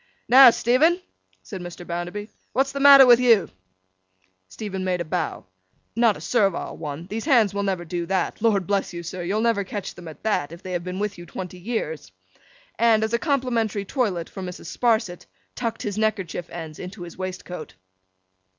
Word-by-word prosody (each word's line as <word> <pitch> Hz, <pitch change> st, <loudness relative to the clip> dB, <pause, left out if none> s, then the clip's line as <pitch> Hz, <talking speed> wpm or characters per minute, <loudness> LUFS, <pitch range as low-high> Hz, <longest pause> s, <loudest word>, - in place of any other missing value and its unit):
'Now, 260 Hz, +1 st, +9 dB
Stephen,' 270 Hz, +10 st, +3 dB, 0.4 s
said 190 Hz, -4 st, -8 dB
Mr. 175 Hz, 0 st, -8 dB
Bounderby, 175 Hz, +5 st, -5 dB, 0.3 s
'what's 270 Hz, +1 st, +1 dB
the 280 Hz, -, -4 dB
matter 275 Hz, -1 st, +9 dB
with 240 Hz, -1 st, +7 dB
you?' 230 Hz, -6 st, +4 dB, 1.0 s
Stephen 190 Hz, -, -5 dB
made 185 Hz, -1 st, 0 dB
a 170 Hz, -, -3 dB
bow. 165 Hz, +1 st, -3 dB, 0.5 s
Not 230 Hz, -3 st, +3 dB
a -, -, -12 dB
servile 200 Hz, -7 st, 0 dB
one—these 170 Hz, -, -5 dB
Hands 235 Hz, -, +4 dB
will 200 Hz, -, -1 dB
never 190 Hz, -3 st, -2 dB
do 170 Hz, 0 st, -4 dB
that! 190 Hz, +2 st, -1 dB
Lord 205 Hz, -5 st, +2 dB
bless 200 Hz, -1 st, -1 dB
you, 170 Hz, 0 st, -6 dB
sir, 175 Hz, +2 st, -6 dB
you'll 195 Hz, +5 st, -1 dB
never 230 Hz, -3 st, +2 dB
catch 200 Hz, 0 st, -6 dB
them 175 Hz, -, -11 dB
at 155 Hz, -2 st, -11 dB
that, 205 Hz, -9 st, 0 dB
if 170 Hz, +1 st, -11 dB
they 185 Hz, -, -6 dB
have 175 Hz, -1 st, -2 dB
been 180 Hz, +1 st, -5 dB
with 205 Hz, -2 st, -3 dB
you 175 Hz, -, -10 dB
twenty 180 Hz, -1 st, -7 dB
years!—and, 180 Hz, -, -2 dB
as 220 Hz, +1 st, -2 dB
a 235 Hz, -, +2 dB
complimentary 235 Hz, -, 0 dB
toilet 195 Hz, -, -1 dB
for 190 Hz, -, -9 dB
Mrs. 180 Hz, -1 st, -7 dB
Sparsit, 220 Hz, -7 st, 0 dB, 0.3 s
tucked 230 Hz, -2 st, -4 dB
his 205 Hz, 0 st, -3 dB
neckerchief 190 Hz, -6 st, -2 dB
ends 160 Hz, -3 st, -8 dB
into 185 Hz, +1 st, -8 dB
his 170 Hz, -, -10 dB
waistcoat. 180 Hz, -, -6 dB
195 Hz, 180 wpm, -24 LUFS, 175-230 Hz, 1.0 s, Now